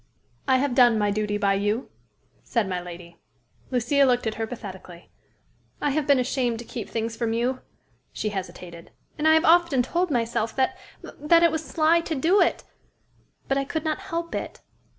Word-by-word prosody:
"I 260 -1 +4
have 275 0 0
done 240 -2 +5
my 205 -1 +1
duty 210 0 -1
by 200 -1 +2
you," 205 +5 -1 0.5
said 230 -5 -1
my 180 -1 -3
lady. 170 -1 -11 0.5
Lucia 255 +3 +2
looked 250 -3 +2
at 220 - -1
her 225 0 -4
pathetically. 190 -7 -10 0.7
"I 290 - 0
have 295 +1 -1
been 280 -1 +5
ashamed 250 -2 0
to 235 - -8
keep 225 -3 -7
things 225 0 -3
from 225 -1 -1
you," 245 +3 -1 0.5
she 215 - -3
hesitated. 180 -3 -7 0.3
"And 305 - +2
I 315 - +6
have 320 +2 +3
often 335 -6 +4
told 345 +7 -1
myself 230 -4 -1
that 265 -1 +1 0.3
that 335 +3 +2
it 335 - +5
was 320 0 -2
sly 320 +2 +2
to 330 -1 -4
do 340 +9 +3
it - - +1 0.8
but 275 0 +1
I - - 0
could 315 +3 -4
not 310 +3 -1
help 340 -3 -5
it." - - -5
245 Hz, 185 wpm, -25 LUFS, 215-310 Hz, 0.8 s, I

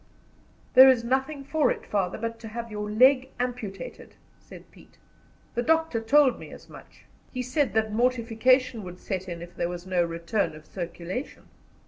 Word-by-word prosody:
"There 260 +1 +10
is 250 -3 +3
nothing 265 +4 -1
for 305 +1 +1
it, - - -3
father, 190 -3 -1
but 230 +1 -4
to 225 - -9
have 230 +1 -6
your 210 0 -4
leg 260 +4 +4
amputated," 235 -7 -5 0.2
said - - -14
Pete. - - -19 0.6
"The 240 - -1
doctor 320 -3 +1
told 275 +3 +4
me - - -10
as - - -13
much. - - -15 0.3
He 255 -1 -3
said 255 0 0
that 220 -1 +1
mortification 250 +1 +2
would 180 -1 -9
set 190 -1 -4
in 170 -1 -6
if 175 0 -12
there 170 - -2
was 175 0 -7
no 185 -2 +1
return 170 +1 -2
of 155 0 -13
circulation." 180 - -6
230 Hz, 170 wpm, -26 LUFS, 185-255 Hz, 0.6 s, There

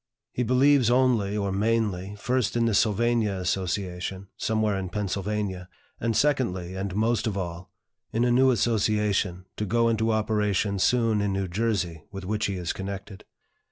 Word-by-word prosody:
He - - -3
believes 130 +1 +4
only 120 -5 +2
or 100 -1 -1
mainly, 105 -2 0
first 125 +1 0
in 115 - +2
the 115 - +1
Sylvania 110 0 +2
Association, 95 +1 -3
somewhere 110 -2 0
in 95 -1 -3
Pennsylvania; 100 -2 -3 0.3
and 115 -1 0
secondly, 95 -12 0
and 95 0 -4
most 115 +1 +1
of 100 -3 -2
all, 85 -1 -5 0.4
in 115 +2 +1
a 120 - +2
new 130 +2 +5
association, 105 -5 +1
to 105 - -1
go 115 +3 +2
into 110 0 +1
operation 105 -2 0
soon 115 0 +2
in 100 -1 0
New 95 0 -1
Jersey, 90 -4 -1
with 95 -2 -7
which 105 +2 -1
he 100 - -2
is 90 -2 -3
connected." 95 0 -7
105 Hz, 155 wpm, -26 LUFS, 95-115 Hz, 0.4 s, new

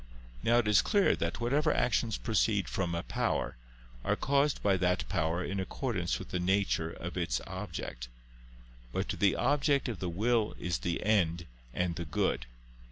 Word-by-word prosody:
Now 120 +1 +3
it 120 -3 +2
is 105 -1 +6
clear 205 -2 +3
that - - -2
whatever 140 +6 +2
actions 115 -2 +1
proceed 105 -4 +1
from 85 -3 -1
a 85 - -2
power, - - -1 0.5
are - - +1
caused 140 +1 +1
by 100 -1 +4
that 90 0 +1
power 80 +2 0
in 100 +3 -3
accordance 95 -2 -2
with - - -9
the 90 - -2
nature 90 -3 +1
of 85 +2 -7
its 80 -8 0
object. - - -6 0.8
But - - -2
the 100 -1 +2
object 145 -1 +2
of 115 -7 -4
the 90 - -2
will 110 +5 +1
is 85 -6 -1
the 85 +7 -2
end 85 -6 +2 0.3
and 90 +3 -1
the 85 - -3
good. 70 -4 -1
95 Hz, 165 wpm, -31 LUFS, 85-120 Hz, 0.8 s, is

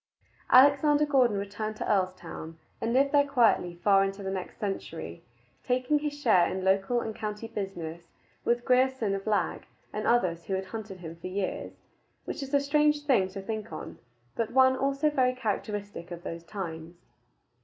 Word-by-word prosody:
Alexander 290 +3 +6
Gordon 255 -7 +3
returned 205 +2 -4
to - - -4
Earlstoun, 185 -4 -2 0.2
and 225 - 0
lived 275 +3 +3
there 285 -1 +4
quietly 225 -9 +3
far 195 -1 +5
into 195 +1 -3
the 190 - -3
next 190 -1 -5
century, 85 - -5 0.4
taking 255 +4 +1
his 290 -1 -4
share 200 -10 +4
in 190 0 -3
local 195 +5 +2
and 220 -2 -5
county 210 +1 -5
business 175 -6 -6 0.4
with 240 0 +1
Grierson 255 -4 +2
of 195 +1 -4
Lag 210 -2 0 0.3
and 215 - -2
others 175 -8 +2
who 195 - -1
had 190 0 -3
hunted 195 -2 -7
him 165 -1 -8
for 170 - -7
years 190 +1 -4 0.4
which - - -5
is 270 -1 -6
a 285 - +4
strange 295 +1 +2
thing 245 -10 +3
to 195 +1 -8
think 215 -2 -5
on, 155 - -8 0.4
but 230 -2 -1
one 260 0 +5
also 275 +3 +1
very 255 -3 +2
characteristic 205 -5 -4
of 175 -1 -8
those 165 0 -6
times. 170 -3 -6
210 Hz, 170 wpm, -28 LUFS, 190-260 Hz, 0.4 s, Alexander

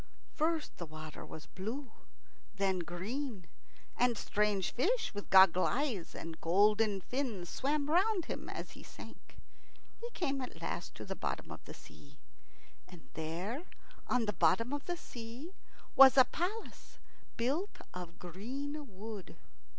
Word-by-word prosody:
First 320 0 0
the 170 - -5
water 155 0 -8
was 155 - -9
blue, 230 +7 -5 0.6
then 195 -2 +2
green, 195 - -4 0.5
and 245 -2 +3
strange 205 -3 +1
fish 445 - +1
with 205 0 -6
goggle 190 -1 +8
eyes 245 - 0
and 165 -1 -7
golden 205 +3 +4
fins 230 -8 -2
swam 285 +1 0
round 365 +3 +3
him - - -5
as - - -5
he - - -11
sank. - - -12 0.6
He 470 - -5
came 275 -6 0
at 255 - -6
last - - -4
to - - -7
the - - -4
bottom - - -3
of - - -8
the - - -9
sea. - - -15 0.7
And 180 -3 -14
there, 175 - -3 0.5
on 250 -2 +2
the 210 - 0
bottom 230 - +3
of 290 0 -3
the 350 -1 -2
sea, 245 +5 -8 0.4
was 270 0 +10
a 260 - +10
palace 400 +7 -4 0.4
built 310 - 0 0.2
of 175 -2 -7
green 270 - -5
wood. 210 -2 -7
230 Hz, 145 wpm, -34 LUFS, 185-285 Hz, 0.7 s, was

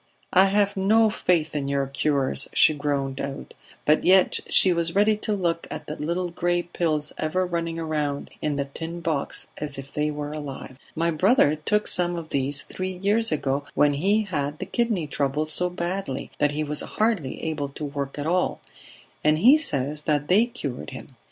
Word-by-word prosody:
"I 185 +1 +7
have 200 +1 +2
no 215 +3 +4
faith 165 -6 0
in 140 -2 -1
your 140 0 0
cures," 140 0 0
she 155 - +6
groaned 140 -2 -2
out. 140 0 -6 0.3
But 150 +1 +3
yet 185 0 +5
she 185 - +5
was 170 0 -1
ready 210 +2 +4
to 215 0 -2
look 170 -4 -1
at - - -6
the 150 - -5
little 170 +4 -2
gray 175 +1 0
pills 155 -4 -2
ever 185 +4 0
running 170 -2 -3
round 150 -3 -2
in 150 -1 -1
the 140 0 -1
tin 165 +5 -7
box 160 -4 -2
as 145 -2 -1
if 135 +1 -9
they 150 0 0
were 150 0 -4
alive. 140 -3 -7 0.2
"My 165 +1 +1
brother 175 - +4
took 210 +8 0
some 175 -1 +2
of 165 -2 -6
these 140 +1 +1
three 185 0 -5
years 205 +5 +1
ago 140 -2 -1
when 145 -1 +4
he 200 +9 +2
had 150 -6 -3
the - - -5
kidney 230 -9 0
trouble 145 +1 -1
so 180 +4 -1
badly 175 -4 -4
that 145 0 +2
he 155 +1 -1
was 150 0 -1
hardly 210 - -1
able 150 -3 -2
to 150 +2 -6
work 140 -1 -5
at 145 - -3
all, 180 +3 0 0.6
and 155 0 +4
he 245 - +7
says 150 - 0
that 145 -1 +1
they 210 +6 +5
cured 150 - -6
him. 130 0 -10
155 Hz, 190 wpm, -24 LUFS, 145-185 Hz, 0.6 s, I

